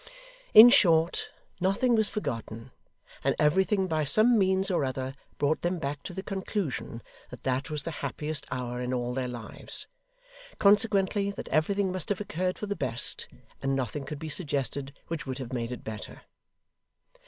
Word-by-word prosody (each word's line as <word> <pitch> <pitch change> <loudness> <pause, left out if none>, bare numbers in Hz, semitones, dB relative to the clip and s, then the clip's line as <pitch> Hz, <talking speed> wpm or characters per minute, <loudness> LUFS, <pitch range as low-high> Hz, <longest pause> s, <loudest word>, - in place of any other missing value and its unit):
In 220 +3 +12
short, 170 - +3 0.3
nothing 195 +7 +2
was 220 -2 +4
forgotten; 115 - -5 0.5
and - - +2
everything 190 +6 +2
by 160 -4 0
some 215 - +6
means 190 -1 +2
or 175 - +1
other 130 0 -3 0.2
brought 145 +2 +1
them 175 +1 -1
back 145 -2 -4
to - - -7
the 190 - -5
conclusion, 190 - -4 0.3
that 125 - -11
that 130 0 -1
was 150 -2 0
the 165 - -4
happiest 150 +2 -3
hour 125 -1 -4
in 125 +1 -2
all 120 0 -2
their 130 0 -2
lives; 120 -3 -5 0.7
consequently, 200 -1 +3
that 200 - -7
everything 195 +5 +1
must 185 -3 -4
have 205 - 0
occurred 185 -2 -2
for - - -4
the 205 0 -3
best, 120 - +1 0.3
and 135 0 0
nothing 135 +2 -3
could 145 +2 -6
be 160 - -7
suggested 140 -3 -3
which 165 -2 -5
would 130 -1 -3
have 130 -2 -6
made 120 -1 -3
it 125 - -7
better. 110 -1 -8
155 Hz, 165 wpm, -28 LUFS, 130-190 Hz, 0.7 s, In